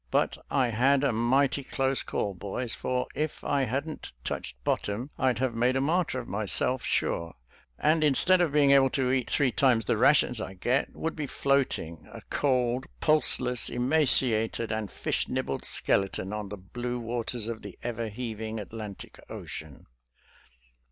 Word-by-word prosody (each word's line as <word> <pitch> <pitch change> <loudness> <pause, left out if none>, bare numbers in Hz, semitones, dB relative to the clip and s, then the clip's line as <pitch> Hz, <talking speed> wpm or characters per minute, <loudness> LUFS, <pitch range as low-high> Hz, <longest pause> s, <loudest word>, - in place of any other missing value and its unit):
But - - +1
I 130 -3 +2
had 130 +5 +3
a 140 - +3
mighty 130 +5 +2
close 135 0 0
call, 100 - -2
boys, 105 +6 -3
for 125 0 -1
if 155 0 -3
I 140 -2 +1
hadn't 140 +6 -4
touched - - -4
bottom 110 - -1
I'd 130 -2 +2
have 130 -1 0
made 120 +3 +2
a - - +2
martyr 155 -1 +1
of - - -7
myself, 110 +5 +1
sure, 85 0 -1 0.4
and 155 +1 +3
instead 180 +6 +5
of 170 -4 +2
being 145 -1 +4
able 135 -1 +6
to 130 -2 +1
eat 130 -2 0
three 135 -3 +3
times 120 -5 +3
the 110 - +1
ra 125 +5 +7
tions 125 -5 +1
I 95 - -6
get, 125 +8 0
would 160 - -3
be 150 -3 -3
floating, 130 - -1
a - - -9
cold, 125 -2 +1
pulseless, 125 -5 +1
emaciated 120 -4 +1
and 110 -2 -2
fish - - -1
nibbled 70 - -2
skeleton, 95 0 0
on 105 -2 -4
the 105 - -6
blue 120 +6 -4
waters 115 -1 -3
of 115 -1 -4
the 100 -3 -9
ever 115 -1 -3
heaving 110 -1 -5
Atlantic 105 0 -8
Ocean." 75 -5 -8
125 Hz, 165 wpm, -28 LUFS, 110-135 Hz, 0.4 s, ra